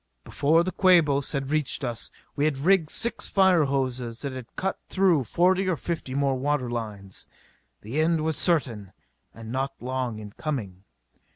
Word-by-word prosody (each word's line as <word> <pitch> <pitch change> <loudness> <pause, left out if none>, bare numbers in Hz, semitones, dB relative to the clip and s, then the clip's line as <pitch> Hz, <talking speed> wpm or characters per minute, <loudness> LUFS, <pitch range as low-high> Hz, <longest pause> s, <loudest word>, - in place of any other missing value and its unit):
Before 160 +4 +2
the 185 - -2
Quabos 160 -8 +3
had 135 -1 -2
reached 150 -4 0
us 120 -2 -2 0.3
we 145 - +1
had 155 -3 +1
rigged 165 +2 +3
six 235 +7 -1
fire 190 -5 +4
hoses 130 -3 -2
and 135 -2 -4
had 125 -3 -7
cut 190 0 -2
through 180 -8 +3
forty 185 - +2
or 180 - +1
fifty 160 -6 -4
more 140 -1 +2
water 140 -3 -1
lines. 105 -5 -6 0.5
The 125 +9 -2
end 165 0 +2
was 160 0 -1
certain 120 - 0 0.4
and 115 0 -10
not 135 +2 -2
long 125 -2 -3
in 105 -1 -9
coming. 100 - -5
140 Hz, 165 wpm, -26 LUFS, 120-165 Hz, 0.5 s, fire